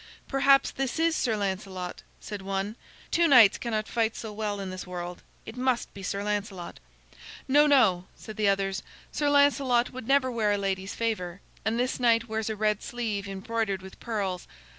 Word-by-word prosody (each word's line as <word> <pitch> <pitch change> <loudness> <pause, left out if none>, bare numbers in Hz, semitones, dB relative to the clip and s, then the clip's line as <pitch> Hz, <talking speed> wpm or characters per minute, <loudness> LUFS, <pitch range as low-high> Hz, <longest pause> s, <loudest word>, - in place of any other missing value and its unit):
"Perhaps 275 0 +4
this 270 +1 -3
is 325 0 +2
Sir 225 -6 0
Lancelot," 190 -2 -4 0.2
said 205 -2 -7
one. 195 +2 -3 0.4
"Two 340 0 +4
knights 240 -8 +7
cannot 220 -3 -2
fight 225 -1 0
so 220 -2 -6
well 210 -1 -3
in 190 -1 -5
this 185 0 -7
world. 175 -1 -6 0.2
It 220 - -8
must 250 -1 0
be 195 - -9
Sir 200 +1 -3
Lancelot." 205 -4 -4 0.7
"No, 295 +3 +5
no," 215 -11 +4
said 215 - -10
the 210 -1 +1
others; 195 0 0 0.3
"Sir 295 -1 0
Lancelot 280 -4 +3
would 255 -2 -7
never 270 -1 +3
wear 215 -3 +1
a - - +1
lady's 195 -1 -2
favor, 195 -6 -2 0.2
and 220 +2 0
this 250 +1 -1
knight 230 -2 +3
wears 220 0 -2
a 220 - -2
red 210 -1 +1
sleeve 215 -4 -3
embroidered 195 0 -2
with 190 - -12
pearls. 200 -6 -3
215 Hz, 180 wpm, -27 LUFS, 195-245 Hz, 0.7 s, knights